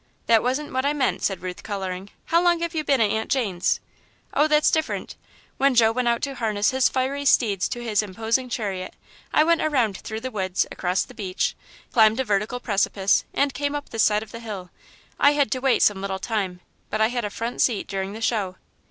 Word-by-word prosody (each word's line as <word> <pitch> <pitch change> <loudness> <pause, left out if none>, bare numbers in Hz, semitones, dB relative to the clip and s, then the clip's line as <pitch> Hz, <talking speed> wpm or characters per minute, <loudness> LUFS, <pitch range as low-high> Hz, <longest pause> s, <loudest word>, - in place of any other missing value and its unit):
"That 225 -2 +5
wasn't 260 +4 -2
what 260 0 0
I 285 +1 +1
meant," 275 -4 0
said 190 -3 -1
Ruth, 180 -1 -5
colouring. 190 -2 -5 0.2
"How 335 +1 +3
long 350 -1 +3
have 340 0 -2
you 315 -2 -1
been 275 -3 +2
at 210 -2 +3
Aunt 220 0 -2
Jane's?" 200 -10 +1 0.5
"Oh, 295 - +4
that's 300 0 +4
different. 315 -1 -2 0.4
When 275 -1 +3
Joe 225 -2 +5
went 250 +1 -1
out 235 0 +1
to 275 - -2
harness 215 -5 0
his 260 -1 +3
fiery 265 +2 -1
steeds 215 -8 +3
to 240 - -5
his 220 -3 +1
imposing 225 +5 -1
chariot, 195 -6 -4 0.4
I 305 - +5
went 335 +1 +3
around 250 -10 +1
through 220 0 -6
the 260 +1 -4
woods, 185 -4 0
across 180 +1 0
the - - -13
beach, 195 -6 -2 0.4
climbed 220 -2 +5
a - - +2
vertical 215 +2 -1
precipice, 200 -3 +1
and 280 -1 +1
came 285 0 -2
up 290 0 -5
this 225 - -1
side 210 0 +3
of 220 - -14
the 230 - -7
hill. 200 -6 -7 0.5
I 285 - +6
had 285 -6 +1
to 255 - 0
wait 265 -1 +3
some 200 -2 +3
little 195 -1 -2
time, 190 -3 -3 0.3
but 215 - -2
I 220 +1 +4
had 240 -1 -2
a 210 - -2
front 230 +4 -3
seat 230 -5 +2
during 195 0 -3
the 220 - -8
show." 205 -5 0
225 Hz, 220 wpm, -24 LUFS, 200-265 Hz, 0.5 s, I